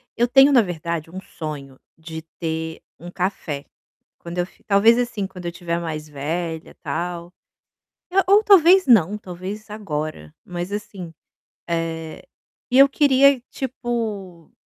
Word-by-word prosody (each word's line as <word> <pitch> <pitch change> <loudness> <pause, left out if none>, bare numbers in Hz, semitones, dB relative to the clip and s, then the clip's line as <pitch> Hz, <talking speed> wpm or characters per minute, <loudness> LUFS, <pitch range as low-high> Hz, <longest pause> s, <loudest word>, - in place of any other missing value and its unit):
Eu 240 - +2
tenho 270 +3 +6
na 255 -4 +6
verdade 170 -4 -4
um 185 +3 -7
sonho 140 -6 -8 0.2
de 160 0 -8 0.2
ter 160 -1 -4 0.2
um 175 - -9
café, 180 -6 -3 0.5
quando 170 +1 -6
eu 175 - +1
fi - - -24
talvez 220 +4 +5
assim, 240 -5 -1
quando 180 -2 -11
eu 170 - -2
estiver 170 -1 -3
mais 155 -2 -5
velha, 160 +3 -4
tal, 170 +3 -4 0.8
e - - -4
ou 410 +2 +6
talvez 375 -1 +6
não, 210 -6 +5
talvez 195 +3 -8
agora, 155 - -5
mas 175 +1 -5
assim, 195 -4 -6 0.6
eh, 165 -1 -3 0.5
e 250 - +4
eu 275 0 +8
queria 275 -1 +4
tipo 220 - -4
180 Hz, 140 wpm, -22 LUFS, 160-225 Hz, 0.8 s, eu